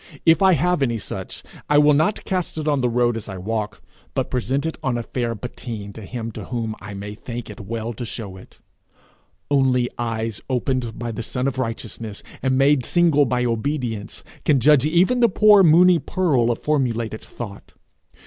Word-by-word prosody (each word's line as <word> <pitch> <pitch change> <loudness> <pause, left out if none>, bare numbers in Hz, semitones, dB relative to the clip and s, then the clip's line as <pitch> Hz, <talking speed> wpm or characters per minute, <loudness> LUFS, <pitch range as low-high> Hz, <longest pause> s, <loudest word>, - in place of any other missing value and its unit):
If 165 +3 +5
I 190 -1 +6
have 180 -1 +1
any 120 -4 +1
such, 105 - -6 0.3
I 145 - +5
will 150 0 +6
not 160 +8 +1
cast 185 -3 -2
it 155 -1 -3
on 145 -3 +2
the 125 - +2
road 120 0 +2
as 110 -2 -6
I 95 - -6
walk, 105 +2 -4 0.3
but - - -1
present 130 +4 -1
it 160 - -4
on 130 -3 0
a 120 - -3
fair 120 -1 -2
patine 110 -3 -7
to 110 - -10
him 115 +2 -5
to - - -8
whom 115 -3 -3
I 100 +1 -8
may 100 +1 -6
think 120 +1 -7
it 105 - -11
well 115 +3 -4
to 120 - -6
show 110 -4 -6
it. 95 - -15 0.9
Only 130 -3 +2
eyes 115 -2 -3
opened 125 -2 -1
by 120 -1 -4
the 115 - -5
sun 125 +3 -2
of 135 -1 -2
righteousness, 115 -3 -5 0.2
and 130 -1 +1
made 135 -1 +4
single 160 -1 +3
by 125 0 0
obedience, 115 -2 -3 0.2
can 140 -3 +3
judge 145 +1 +5
even 180 +10 +3
the 235 -1 +5
poor 210 +1 +6
moony 175 +1 +6
pearl 145 -13 +1
of 120 - -2
formulated 120 -7 -1
thought. 105 -4 -9
125 Hz, 190 wpm, -22 LUFS, 115-150 Hz, 0.9 s, I